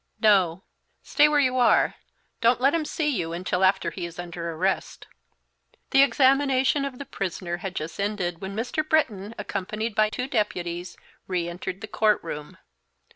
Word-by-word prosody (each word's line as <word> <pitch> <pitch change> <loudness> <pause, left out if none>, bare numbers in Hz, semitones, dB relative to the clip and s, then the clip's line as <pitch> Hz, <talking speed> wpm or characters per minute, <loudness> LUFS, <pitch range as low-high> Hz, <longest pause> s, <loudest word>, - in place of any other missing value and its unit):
"No; 190 -5 +3 0.4
stay 295 0 +4
where 300 -1 +3
you 255 -2 +2
are; 245 - +4 0.5
don't 235 +1 +4
let 270 +3 +3
him 330 -2 0
see 310 0 -2
you 175 - -1
until 180 +1 -1
after 190 +1 +3
he 175 -3 -5
is 170 - -12
under 170 -1 -5
arrest." 180 +4 -2 0.9
The 270 - +6
examination 275 +1 +3
of 270 -2 -6
the 280 - -7
prisoner 180 -5 -4
had 190 +1 -6
just 160 +3 -5
ended 195 -4 -2
when 195 +1 -5
Mr. 245 +7 -1
Britton, 230 -10 0
accompanied 215 +2 -3
by 215 +1 +3
two 250 +4 -3
deputies, 175 -7 -2 0.3
re 180 -2 -1
entered 180 +2 -6
the 220 - -6
court 210 0 +2
room. 150 -3 -7
205 Hz, 165 wpm, -25 LUFS, 175-255 Hz, 0.9 s, The